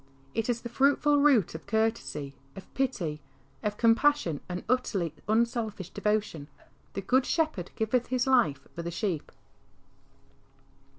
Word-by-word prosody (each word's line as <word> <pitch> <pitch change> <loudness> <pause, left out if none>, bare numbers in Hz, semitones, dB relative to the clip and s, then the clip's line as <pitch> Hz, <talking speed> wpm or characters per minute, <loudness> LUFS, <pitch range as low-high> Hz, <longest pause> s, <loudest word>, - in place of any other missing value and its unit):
It 225 +1 -1
is 235 -1 0
the - - -5
fruitful 285 +3 +3
root 275 - +4
of 160 - -9
courtesy, 220 -10 -1 0.2
of 195 - -12
pity, 180 - -1 0.4
of 210 -1 -2
compassion 230 - +3
and 180 0 -4
utterly 200 - 0
unselfish 220 -4 0
devotion. 205 -8 -1 0.2
" - - -35
The 195 - -2
Good 255 +7 +3
Shepherd 310 - 0
giveth 230 +3 0
His 250 -1 0
life 235 - +2
for 170 - -5
the 170 - -4
sheep." 170 -3 -3
220 Hz, 135 wpm, -29 LUFS, 180-250 Hz, 0.4 s, root